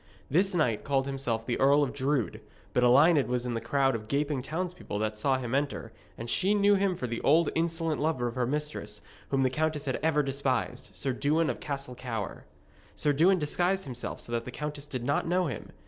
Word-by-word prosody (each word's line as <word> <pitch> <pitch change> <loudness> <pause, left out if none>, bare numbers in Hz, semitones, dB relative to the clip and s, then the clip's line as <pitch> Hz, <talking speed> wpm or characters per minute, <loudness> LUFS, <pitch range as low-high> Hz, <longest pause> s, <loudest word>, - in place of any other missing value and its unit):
This 185 +5 +2
knight 125 -10 +1
called 135 -1 +1
himself 130 -5 -2
the 120 - -1
Earl 140 +2 +5
of 135 -2 -2
Drood, 135 -7 -1 0.3
but 125 - +3
Elined 140 +4 +5
was 125 0 -1
in 125 - -2
the 115 - -2
crowd 135 -1 +2
of 110 -2 -5
gaping 140 +1 0
townspeople 170 - -4
that 110 0 -1
saw 130 +5 +1
him 125 -2 -4
enter, 140 -5 -1 0.3
and 115 - -6
she 190 - +2
knew 205 0 +5
him 195 -2 +2
for 130 - -4
the 115 -1 -3
old 160 +2 +4
insolent 165 -2 0
lover 150 -5 0
of 120 - -4
her 125 -1 0
mistress, 145 -7 -4 0.3
whom 135 -1 +2
the 130 - +2
countess 155 0 -1
had 130 - -1
ever 150 -1 +2
despised, 135 -5 -1
Sir 130 +8 -1
Dewin 155 +5 +1
of - - -8
Castle 140 -3 -4
Cower. 115 -6 -5 0.5
Sir 145 -1 +1
Dewin 175 +7 +4
disguised 180 +5 0
himself 125 -3 -5
so - - -6
that 115 -1 -1
the - - -6
countess 150 +2 -5
did 130 -4 -4
not 140 +5 0
know 180 +1 +2
him. 130 -9 -5
140 Hz, 210 wpm, -29 LUFS, 125-155 Hz, 0.5 s, Earl